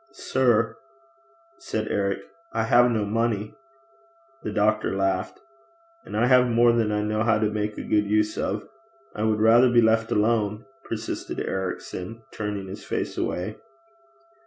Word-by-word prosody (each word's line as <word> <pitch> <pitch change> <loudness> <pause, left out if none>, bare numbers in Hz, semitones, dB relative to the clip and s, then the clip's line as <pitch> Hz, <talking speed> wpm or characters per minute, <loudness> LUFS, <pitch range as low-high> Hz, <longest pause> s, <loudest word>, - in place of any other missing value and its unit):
'Sir,' 115 -3 +1 0.8
said 110 0 -3
Eric, 100 -1 0 0.3
'I 110 - 0
have 120 +2 +5
no 110 -3 0
money.' 110 0 -1 0.9
The 105 - -4
doctor 105 -1 +1
laughed. 95 0 -1 0.7
'And - - -5
I 115 - +3
have 125 0 +5
more 120 0 +4
than 115 -2 +1
I 105 0 0
know 105 +1 -1
how 110 -1 +3
to 105 0 0
make 105 0 -3
a - - -4
good 105 -1 +1
use 105 0 +2
of.' 105 +2 -3 0.5
'I - - -4
would 110 -1 +1
rather 115 +3 +6
be 120 0 +4
left 115 0 +3
alone,' 105 +1 +1 0.2
persisted 110 -1 -5
Ericson, 95 +3 -4
turning 105 -2 -4
his 95 0 -8
face - - -3
away. 95 +5 -3
110 Hz, 150 wpm, -25 LUFS, 105-115 Hz, 0.9 s, rather